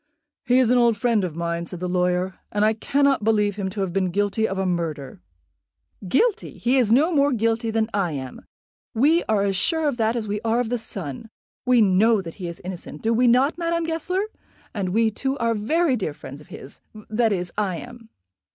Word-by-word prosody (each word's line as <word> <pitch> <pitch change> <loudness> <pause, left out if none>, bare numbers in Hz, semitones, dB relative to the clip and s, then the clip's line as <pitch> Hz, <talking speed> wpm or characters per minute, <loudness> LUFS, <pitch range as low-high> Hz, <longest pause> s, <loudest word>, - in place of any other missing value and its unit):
"He 250 +1 +4
is 250 -2 +4
an 250 - +4
old 235 -2 +3
friend 225 -1 +1
of 175 -4 -4
mine," 170 0 -3
said 180 - -7
the 180 - -3
lawyer, 180 +1 0
"and 210 0 +2
I 220 - +3
cannot 275 +2 +1
believe 210 -2 +2
him 195 -2 -3
to 200 +1 -5
have 185 -3 -2
been 190 -1 +1
guilty 205 +4 0
of 190 - -4
a 190 - 0
murder." 160 - -3 0.9
"Guilty! 435 - +1
he 250 +3 +1
is 235 -5 +2
no 295 +9 +4
more 285 -1 +3
guilty 230 -1 0
than 220 0 0
I 190 -5 0
am. 130 -2 -7 0.5
We 300 +9 +3
are 210 -2 +2
as 195 -1 0
sure 320 - +1
of 275 -4 -1
that 225 0 +1
as 225 -3 -3
we 205 +1 -3
are 230 +1 +1
of 245 -2 -1
the 245 - 0
sun. 195 - -5 0.4
We 250 -2 +5
know 210 +3 +4
that 175 +1 -8
he 175 - -3
is 170 - -6
innocent; 175 -4 -8
do 225 +1 +2
we 245 +2 +3
not, 260 +7 +3
Madame 335 0 0
Goesler? 330 +4 -1 0.5
And 200 -5 -2
we, 220 +3 +2
too, 270 +5 -3
are 230 -2 +1
very 270 +8 +1
dear 185 -10 -3
friends 140 +1 -10
of 150 - -16
his; 135 - -11 0.3
that 225 0 +2
is, 180 -3 -2
I 200 -4 -1
am." 240 +2 -11
220 Hz, 215 wpm, -23 LUFS, 185-245 Hz, 0.9 s, We